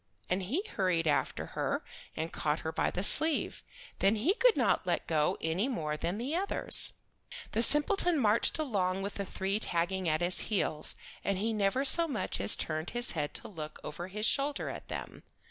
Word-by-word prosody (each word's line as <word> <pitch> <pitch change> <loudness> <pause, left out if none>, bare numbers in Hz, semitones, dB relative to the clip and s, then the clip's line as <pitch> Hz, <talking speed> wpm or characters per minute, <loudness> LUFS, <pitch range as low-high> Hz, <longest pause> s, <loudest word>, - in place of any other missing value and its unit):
And 185 +2 0
he 260 - -2
hurried 180 - -1
after 150 -2 -1
her - - -2 0.3
and 160 +1 -5
caught 150 +1 -2
her 160 - -4
by - - -1
the 180 - -4
sleeve. 310 +8 +4 0.4
Then 195 +3 +3
he 260 - +1
could - - +3
not - - +1
let - - -1
go 155 -2 0
any 165 +8 -1
more 155 - -3
than 170 +5 -3
the 260 +8 -3
others. 390 +3 +3 0.6
The 225 - 0
simpleton 320 - +1
marched 225 +1 +2
along 195 -10 -2
with 200 - -5
the 200 - -5
three 195 +2 -3
tagging 180 -1 -2
at 155 +2 0
his 175 +1 +1
heels, 170 -7 -1 0.3
and 200 -1 -1
he 220 +4 -2
never 215 +6 0
so 335 +4 +8
much 270 -8 -3
as - - +10
turned 155 +1 -3
his 240 - +2
head 150 -4 -4
to - - +2
look 155 -6 -9
over 175 +4 -7
his 210 +3 -4
shoulder 280 +3 -1
at - - -10
them. - - -8
195 Hz, 190 wpm, -30 LUFS, 170-255 Hz, 0.6 s, as